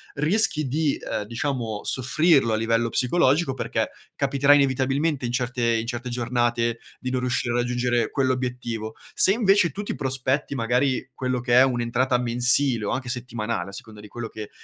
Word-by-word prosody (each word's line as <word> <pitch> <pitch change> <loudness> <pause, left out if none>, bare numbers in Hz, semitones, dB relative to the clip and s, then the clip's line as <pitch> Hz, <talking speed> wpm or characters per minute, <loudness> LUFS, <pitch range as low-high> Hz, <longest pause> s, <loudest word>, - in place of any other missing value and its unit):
rischi 155 -1 +2
di, 150 +2 0
ehm, - - -4
diciamo 115 -1 -3
soffrirlo 135 0 +2
a 110 - +1
livello 115 +1 +1
psicologico 135 +3 +2
perché - - -2 0.2
capiterà 140 +1 +2
inevitabilmente 140 +1 +1
in 120 - -2
certe 120 -1 0
in 115 +1 -3
certe 120 +1 -4
giornate 120 -1 -1 0.2
di 130 - -4
non 130 0 -1
riuscire 125 -1 -1
a - - +1
raggiungere 120 0 0
quell'obiettivo. 125 -4 -2 0.2
Se, - - +5
invece, 200 -5 +3
tu 205 - -5
ti - - -4
prospetti, 135 +2 -2
magari, 125 +2 0
quello 125 -1 -2
che 120 0 -1
è - - +8
un'entrata 125 0 +1
mensile 125 0 +2
o - - -1
anche 130 -1 -3
settimanale 120 -6 -3
a - - -9
seconda 105 +1 -10
di 105 - -13
quello 120 +2 -6
che, 110 -1 -8
125 Hz, 170 wpm, -24 LUFS, 120-135 Hz, 0.2 s, è